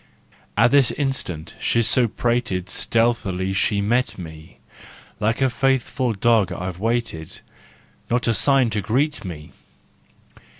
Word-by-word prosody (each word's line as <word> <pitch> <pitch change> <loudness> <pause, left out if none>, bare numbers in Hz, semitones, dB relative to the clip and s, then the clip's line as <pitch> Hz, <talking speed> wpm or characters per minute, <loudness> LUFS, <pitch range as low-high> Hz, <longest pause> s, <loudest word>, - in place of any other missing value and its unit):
At - - +4
this 140 -3 +5
instant, 135 - -3
so 115 - +2 0.2
she - - +2
prated, 115 -6 -2
Stealthily 100 -5 0
she'd 100 +1 0
meet 120 +5 0
me: 80 -3 -11 0.6
Like 110 +4 0
a - - +4
faithful 130 -1 0
dog 110 0 +2
I've 90 0 -5
waited, 115 -7 -3 0.7
Not 120 +1 0
a 115 - +3
sign 135 -1 +4
to 105 -1 -1
greet 135 - 0
me! 80 -5 -8
115 Hz, 125 wpm, -22 LUFS, 95-125 Hz, 0.7 s, this